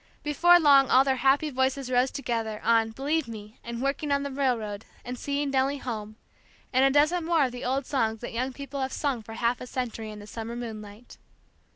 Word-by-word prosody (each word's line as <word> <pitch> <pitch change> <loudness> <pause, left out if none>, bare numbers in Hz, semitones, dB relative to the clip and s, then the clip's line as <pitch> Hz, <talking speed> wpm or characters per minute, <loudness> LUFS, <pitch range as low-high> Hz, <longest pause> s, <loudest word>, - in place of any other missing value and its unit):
Before 345 +4 +5
long 280 -4 +6
all 260 - +6
their 265 -1 +1
happy 275 +4 +2
voices 260 0 0
rose 250 +1 +3
together, 230 -5 -3
on 225 -1 +3
"Believe 280 +5 -1
me," 215 0 -10
and 235 +1 -5
"Working 285 +2 -1
on 280 0 +2
the 280 - -4
Railroad," 230 -6 -1 0.2
and 250 - -4
"Seeing 280 +2 -2
Nellie 270 +1 +1
Home," 220 -5 -6 0.6
and 260 +1 +4
a 270 - +6
dozen 305 +5 +3
more 325 -3 +3
of 255 - -3
the 245 0 -7
old 265 +2 -1
songs 225 -6 0
that 240 - -6
young 255 +3 -1
people 280 +1 -6
have 265 0 -2
sung 275 -6 -1
for 225 +1 -10
half 235 +2 0
a 250 - -7
century 235 -4 -4
in 210 - -8
the 205 - -10
summer 225 +2 -6
moonlight. 220 -1 -8
255 Hz, 210 wpm, -27 LUFS, 230-280 Hz, 0.6 s, long